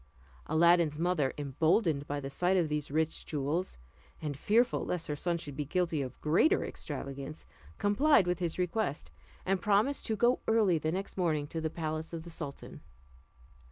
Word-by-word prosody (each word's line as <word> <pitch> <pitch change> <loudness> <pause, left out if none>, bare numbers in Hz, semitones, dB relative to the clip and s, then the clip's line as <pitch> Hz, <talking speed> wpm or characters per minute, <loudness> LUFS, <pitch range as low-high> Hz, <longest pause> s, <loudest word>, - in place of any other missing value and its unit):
Aladdin's 170 -1 +4
mother, 165 -5 +1
emboldened 150 - +1
by 145 0 -2
the 135 0 -6
sight 180 +6 +2
of 170 -4 +1
these 150 -1 -2
rich 160 +2 0
jewels, 150 +5 -2 0.4
and 150 -3 -4
fearful 225 - +2
lest 175 -2 -2
her 150 - -3
son 170 +3 -1
should 145 -4 -7
be 150 - -2
guilty 165 0 0
of 130 -2 -6
greater 165 - +3
extravagance, 140 +2 -6 0.3
complied 205 - +4
with 180 -1 -1
his 170 -3 -2
request, 180 -3 -2 0.3
and 190 0 +1
promised 210 +7 +2
to 220 - 0
go 240 +4 +3
early 215 -6 +4
in - - -6
the 155 - 0
next 195 +3 -4
morning 160 -5 +1
to 160 +2 -5
the 160 - -1
palace 155 0 -4
of 165 -1 -5
the 170 - -10
sultan. 145 -4 -8
165 Hz, 175 wpm, -31 LUFS, 150-185 Hz, 0.4 s, Aladdin's